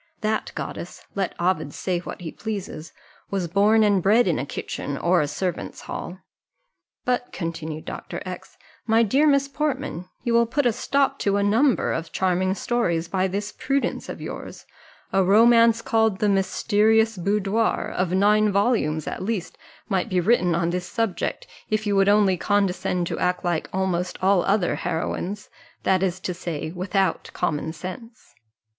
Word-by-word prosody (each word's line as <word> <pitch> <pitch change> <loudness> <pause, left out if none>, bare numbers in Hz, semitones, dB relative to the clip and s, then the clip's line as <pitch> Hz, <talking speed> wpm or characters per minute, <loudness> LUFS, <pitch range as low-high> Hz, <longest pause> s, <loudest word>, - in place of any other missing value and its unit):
That 215 0 -1
goddess 175 - -6
(let 195 -2 -2
Ovid 165 -5 0
say 180 -2 -1
what 175 - -8
he 165 -3 -5
pleases) 195 -7 -6 0.4
was 190 -3 -1
born 210 +5 +4
and 205 -3 +3
bred 210 +4 +4
in 170 - +1
a 140 - -3
kitchen, 140 0 -4
or 175 +2 +3
a 145 - 0
servants' 175 +5 -4
hall. 180 - -6 0.9
But," 245 0 0
continued 165 -3 -5
Dr. - - -6
X, - - -8 0.3
"my 225 +1 +4
dear 270 +8 +3
Miss 280 -1 +3
Portman, 275 - -3
you 240 -2 0
will 235 0 +4
put 285 +4 0
a 240 - +3
stop 275 +3 0
to 200 0 +1
a 200 - +1
number 230 +6 +3
of 165 0 -4
charming 185 0 +1
stories 175 -9 0
by 190 +1 0
this 200 +2 -3
prudence 275 0 -2
of - - -6
yours - - -8 0.5
a 195 0 +4
romance 230 +3 +5
called 220 -3 +2
the 210 - +1
Mysterious 220 +3 +2
Boudoir, 200 +4 0
of 180 -1 -1
nine 210 +2 +4
volumes 200 - +1
at - - -5
least, 185 -4 -3 0.3
might 190 -3 0
be 185 - +1
written 180 -3 +3
on 170 0 0
this 180 0 -3
subject, 225 -6 -2 0.2
if 215 0 0
you 205 -1 +1
would 195 0 +4
only 205 -3 +4
condescend 185 -2 0
to - - -4
act 180 0 0
like 175 -2 -1
almost 185 -1 -1
all 190 -1 +3
other 195 -3 +2
heroines, 180 +4 -3 0.4
that 190 -1 +2
is 185 -1 0
to 180 - -3
say, 165 -3 -5
without 190 +2 -1
common 155 0 -1
sense." 205 +8 -9
195 Hz, 165 wpm, -24 LUFS, 180-220 Hz, 0.9 s, romance